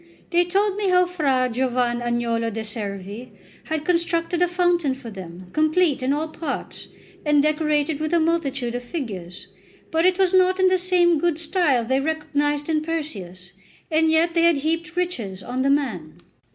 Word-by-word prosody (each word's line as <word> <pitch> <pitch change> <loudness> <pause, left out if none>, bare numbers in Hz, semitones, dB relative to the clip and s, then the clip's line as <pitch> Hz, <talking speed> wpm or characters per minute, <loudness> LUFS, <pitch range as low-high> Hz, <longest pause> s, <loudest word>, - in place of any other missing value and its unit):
They 350 0 +3
told 395 +3 +1
me 405 -2 0
how 360 0 +5
Fra 280 -8 +1
Giovan 245 -1 0
Agnolo 235 -1 -1
de' 220 +1 -4
Servi 210 +1 -6 0.3
had 315 -1 -3
constructed 335 0 0
a 355 - +5
fountain 350 -5 +1
for 250 -4 -10
them, 180 -2 -10
complete 310 -1 +2
in 255 +1 0
all 300 +3 0
parts, 315 -2 -5 0.4
and 295 -1 +3
decorated 305 -1 +1
with 310 0 -2
a 340 - +3
multitude 280 -7 0
of 245 - -3
figures; 205 - -6 0.5
but 325 0 +2
it 370 -1 +2
was 380 -1 +2
not 370 0 +4
in 375 0 +5
the 370 0 +2
same 350 -3 +3
good 345 -1 +1
style 310 -7 +1
they 260 +3 +1
recognised 295 -1 -1
in 315 -2 +1
Perseus, 195 - -5 0.4
and 320 0 +3
yet 325 +2 +3
they 335 - +2
had 335 -2 +4
heaped 330 +4 -2
riches 230 - -3
on 250 +1 -3
the 275 - +2
man. 200 - -1
305 Hz, 175 wpm, -23 LUFS, 245-340 Hz, 0.5 s, how